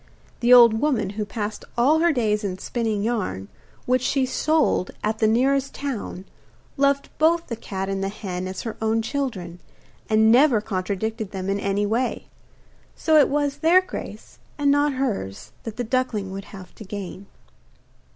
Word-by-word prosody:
The 240 0 +2
old 235 -3 +8
woman, 240 -10 +1
who 210 +1 -3
passed 210 0 -5
all 285 +7 +4
her 340 +1 +4
days 215 -6 0
in 185 -2 -3
spinning 220 0 -2
yarn, 185 - -2 0.4
which 255 0 +2
she 265 +1 +1
sold 305 - +1
at 215 +1 -1
the 220 - +3
nearest 270 +4 +1
town, 235 -9 -5 0.5
loved 280 0 +1
both 330 +2 +3
the 235 - -4
cat 195 -3 -5
and 195 0 -2
the 195 - -1
hen 185 -3 -5
as 185 0 -5
her 225 -2 -5
own 220 0 +1
children, 220 - -4 0.5
and 220 0 +5
never 250 -1 +5
contradicted 210 +1 -3
them 195 -1 -3
in 200 - -1
any 200 +1 0
way; 235 +5 -1 0.7
so 315 - +1
it 285 - +4
was 285 0 0
their 330 +4 +5
grace, 370 0 -8 0.2
and 285 -1 +3
not 290 0 +2
hers, 215 - -3
that 225 -2 -6
the 245 - -1
duckling 230 -5 -1
would 195 +1 -6
have 190 -3 -12
to - - -11
gain. 195 -1 -7
220 Hz, 170 wpm, -23 LUFS, 200-275 Hz, 0.7 s, old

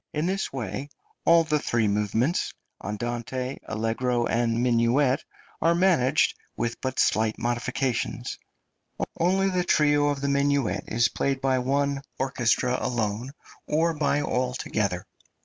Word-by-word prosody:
In 150 +2 -1
this 190 +2 -1
way 130 +2 -4 0.4
all 170 0 +6
the 155 -2 +1
three 115 -5 +1
movements 105 - 0 0.3
andante, 120 +4 -3
allegro, 120 +2 0
and 115 0 +1
minuet 125 +3 +2 0.4
are 170 +1 +4
managed, 165 -7 +3 0.2
with 120 +1 -2
but 130 -1 -3
slight 110 0 +2
modifications; 120 0 -2 0.8
only 190 +3 +2
the 180 -1 +1
trio 145 -3 +3
of 140 -1 -2
the 140 - 0
minuet 140 -3 +1
is 115 +1 +3
played 135 -1 -1
by 130 -1 +1
one 140 +2 0 0.2
orchestra 125 -1 +1
alone, 115 0 -1 0.4
or 165 +2 +2
by 145 -1 +1
all 125 -2 -1
together. 100 -8 -2
130 Hz, 130 wpm, -26 LUFS, 120-145 Hz, 0.8 s, all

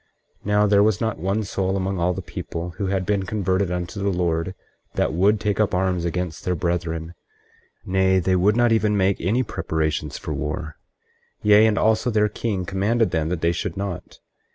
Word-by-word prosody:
24:6 - - -25
Now 105 0 +3
there 100 -1 +4
was 105 -2 +3
not 110 -5 -2
one 100 +5 0
soul 95 -1 -1
among 95 0 -2
all 85 +1 +2
the 95 +1 -6
people 85 0 -6
who 100 - -1
had 95 -1 -1
been 100 0 +1
converted 95 -1 0
unto 90 +2 -4
the 100 - +1
Lord 90 0 -1 0.4
that - - +1
would 100 +5 +3
take 105 0 -1
up 105 -4 +2
arms 90 -2 0
against 85 -1 -3
their 90 - 0
brethren; 85 -1 -2 0.7
nay, 95 0 +2
they 95 +1 +2
would 100 +4 +3
not 120 -1 +4
even 105 -2 +2
make 95 0 +1
any 110 +9 +1
preparations 80 - -2
for - - -5
war; 75 +1 -4 0.7
yea, 105 +1 +6
and 105 -2 +1
also 110 +2 +2
their 105 -2 +2
king 100 -4 -3
commanded 105 +5 +1
them 80 -2 0
that 85 -2 -2
they 85 - +3
should 85 - -4
not. 100 -3 -5
95 Hz, 195 wpm, -23 LUFS, 85-105 Hz, 0.7 s, yea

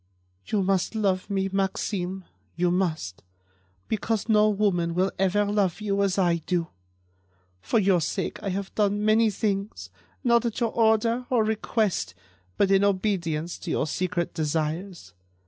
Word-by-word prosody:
"You 205 -3 +1
must 190 +3 0
love 195 -3 0
me, 195 -1 0
Maxime; 190 -1 -2 0.3
you 175 0 +1
must—because 95 - -4
no 215 0 +5
woman 185 -5 +1
will 185 +2 +1
ever 195 +2 +2
love 200 -3 0
you 200 -2 0
as 195 -1 +1
I 175 -3 +3
do. 170 0 -2 0.9
For 230 - 0
your 190 -4 +3
sake, - - -3
I 200 - -3
have 195 +1 -4
done 205 0 +1
many 220 +1 +4
things, 195 - -3 0.3
not 235 -2 +4
at 235 -3 -2
your 230 -2 0
order 230 +2 +2
or 240 -4 +3
request, 215 - -1 0.4
but 195 - +3
in 195 0 +4
obedience 180 -5 -1
to - - -7
your - - 0
secret 175 +1 -2
desires. 160 - -3
195 Hz, 145 wpm, -26 LUFS, 170-210 Hz, 0.9 s, no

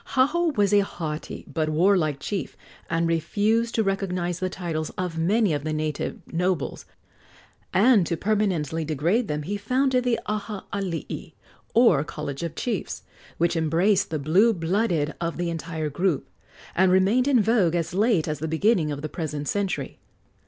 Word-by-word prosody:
Haho 315 +6 +3
was 205 -1 +3
a 205 - +7
haughty 160 -6 -4
but 155 -2 -1
warlike 155 -3 +2
chief, 200 +3 -4 0.3
and 165 0 +1
refused 210 +8 +1
to 225 - +2
recognize 185 -3 -1
the 185 - -1
titles 165 -4 -3
of 180 -3 -3
many 200 +2 +2
of 145 -1 -2
the 155 0 -2
native 155 -1 -2 0.2
nobles; 180 -3 -1 0.9
and, 215 0 +5
to 170 - -1
permanently 180 -7 0
degrade 165 - 0
them, 150 -2 -2
he 205 +7 -3
founded 255 +4 +1
the 245 -2 +1
Aha 210 -1 -4
alii, 190 -5 -4 0.4
or 225 - +5
college 150 -3 -6
of 165 -2 -4
chiefs, 225 -7 -3 0.3
which 170 +1 +1
embraced 170 +5 +2
the 160 - -1
blue 180 +11 +4
blooded 170 -3 0
of 170 -1 -2
the 175 -1 -1
entire 160 -2 -4
group, 175 0 0 0.5
and 185 0 +4
remained 200 +8 +3
in 270 -4 +4
vogue 205 -6 +3
as 165 0 -1
late 200 -4 +2
as 155 -1 -2
the 160 - -3
beginning 160 0 +2
of 145 0 -5
the - - -1
present 150 -2 -4
century. 200 +2 -2
180 Hz, 160 wpm, -25 LUFS, 160-205 Hz, 0.9 s, a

